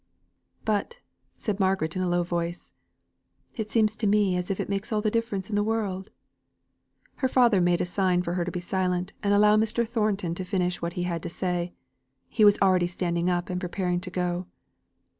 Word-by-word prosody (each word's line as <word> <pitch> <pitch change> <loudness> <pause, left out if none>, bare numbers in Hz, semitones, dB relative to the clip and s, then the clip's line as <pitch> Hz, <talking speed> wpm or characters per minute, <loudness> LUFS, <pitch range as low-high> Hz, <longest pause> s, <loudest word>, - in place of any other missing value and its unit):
"But," 215 - -1 0.4
said 210 -2 -3
Margaret 190 -4 +1
in 185 - -1
a 180 - 0
low 175 0 +2
voice, 170 0 -3 0.8
"it 220 -3 -5
seems 215 -2 +3
to 215 - 0
me 200 -3 +3
that 185 +2 -4
it - - -2
makes 200 +2 -3
all 215 - +1
the 210 0 0
difference 215 -4 -1
in 215 - -3
the 205 - +3
world 205 -3 -2 0.5
." - - -41
Her 265 - +1
father 240 -7 +4
made 175 0 +2
a - - +1
sign 180 -1 +1
to 170 - -2
her 180 -1 0
to 175 - -3
be 180 0 -4
silent, 180 0 -1
and 200 - +1
allow 210 +1 +5
Mr. 225 +2 +1
Thornton 210 -6 0
to 185 - -4
finish 180 -1 -1
what 170 0 -3
he 175 - -2
had 170 -2 -2
to - - -5
say. 175 0 -2 0.5
He 220 - +2
was 205 -1 +7
already 185 -2 +4
standing 175 -1 -1
up 180 +2 -1
and 180 0 -2
preparing 180 -1 -1
to 185 - -5
go. 180 0 -2
185 Hz, 200 wpm, -26 LUFS, 175-210 Hz, 0.8 s, was